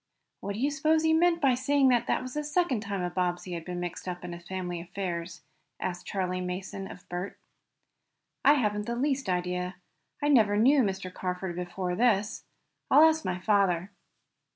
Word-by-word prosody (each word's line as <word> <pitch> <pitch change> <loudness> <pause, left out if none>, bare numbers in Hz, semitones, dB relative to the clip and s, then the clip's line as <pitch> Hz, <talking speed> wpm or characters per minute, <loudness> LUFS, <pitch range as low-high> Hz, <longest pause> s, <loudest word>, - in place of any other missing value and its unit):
"What 200 - -4
do - - -5
you 280 +4 +1
s'pose 310 +2 +2
he 320 0 +4
meant 340 +1 +4
by 275 -5 +4
saying 265 +2 +3
this 245 -2 +3
was 255 0 -1
the 300 - -2
second 300 -4 +1
time 200 -3 -3
a 175 - -2
Bobbsey 180 0 -2
had 170 -1 -4
been 180 +1 -5
mixed 175 +1 -5
up 180 0 -5
in 175 - -6
his 170 0 -10
family 180 -2 -4
affairs?" 175 -1 -5 0.4
asked 175 -1 -4
Charley 185 -2 -2
Mason 190 +2 -5
of 180 - -12
Bert. 180 +2 -5 1.1
"I 285 - +7
haven't 210 -5 0
the 235 - -1
least 270 -1 0
idea. 180 0 -1 0.4
I 290 - 0
never 215 -7 +5
knew 265 +6 +5
Mr. 190 -4 -2
Carford 180 -1 -3
before 180 +1 -3
this. 210 0 +1 0.4
I'll 300 - +7
ask 320 0 +4
my 180 - -2
father." 190 -2 +1
195 Hz, 180 wpm, -28 LUFS, 180-260 Hz, 1.1 s, I